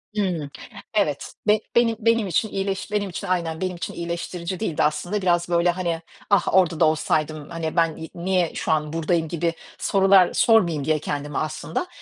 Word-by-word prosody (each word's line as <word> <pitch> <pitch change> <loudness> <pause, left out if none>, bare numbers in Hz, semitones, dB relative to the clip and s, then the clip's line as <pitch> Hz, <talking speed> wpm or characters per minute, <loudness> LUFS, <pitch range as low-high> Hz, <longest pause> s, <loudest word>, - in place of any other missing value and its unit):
Hımm. 175 -8 -1 0.4
Evet, 150 -9 0
be 210 0 +5 0.2
benim 235 -1 +4
benim 230 -2 +2
için 200 +5 0
iyileş 195 +1 -3
benim 205 -2 0
için 185 +2 -6
aynen, 170 -2 -1
benim 185 -1 -2
için 170 - -5
iyileştirici 170 +1 -4
değildi 165 -7 0
aslında. 175 +7 0
Biraz 175 -1 +1
böyle, 170 0 +3
hani, 170 -2 -1 0.3
"Ah, 200 - +3
orada 175 -4 +3
da 165 - +6
olsaydım. 155 -1 0
Hani, 165 -2 -4
ben 165 -2 +2
y 160 - -7
niye 180 -1 0
şu - - -1
an 150 0 0
buradayım?" 165 0 0
gibi 170 +1 -1 0.2
sorular 195 -2 +4
sormayayım 170 -11 +3
diye 155 -1 +2
kendime 145 0 -4
aslında. 155 - -3
170 Hz, 175 wpm, -23 LUFS, 160-190 Hz, 0.4 s, da